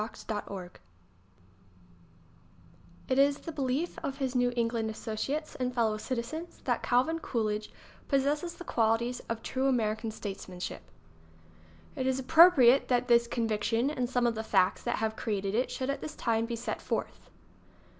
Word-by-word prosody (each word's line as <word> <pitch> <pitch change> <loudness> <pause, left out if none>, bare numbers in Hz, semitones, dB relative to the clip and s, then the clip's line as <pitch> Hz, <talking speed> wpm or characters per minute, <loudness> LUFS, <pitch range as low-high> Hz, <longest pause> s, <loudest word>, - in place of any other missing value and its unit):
OCT 215 -1 -6
1 185 -3 -6 2.4
1A753223 260 - +1
T - - +7
is 280 0 +3
the 330 - -7
belief 285 +3 -2
of 275 - -4
his 265 -3 -2
New 245 -1 +2
England 230 -1 0
associates 230 +8 -3
and 250 -1 -3
fellow 220 -3 +2
citizens 255 +9 -5
that - - 0
Calvin 265 +7 +2
Coolidge 215 -6 -2 0.4
possesses 295 +5 0
the - - -9
qualities 235 -1 +1
of 230 0 -3
true 265 +1 0
American 225 -3 0
statesmanship. 190 -4 -6 1.1
It 260 - -1
is 260 0 +1
appropriate 275 -2 +6
that 245 0 +1
this 235 0 +5
conviction 230 +2 0
and 250 -5 -2
some 245 -1 +1
of 235 - +2
the 220 0 -4
facts 185 -4 +2
that - - -1
have 220 0 -1
created 200 -3 -2
it 245 +4 +1
should 260 +1 -2
at 280 - -5
this 310 - -6
time 230 0 0
be 235 - -3
set 230 - -4
forth. - - -4
245 Hz, 155 wpm, -30 LUFS, 220-270 Hz, 2.4 s, T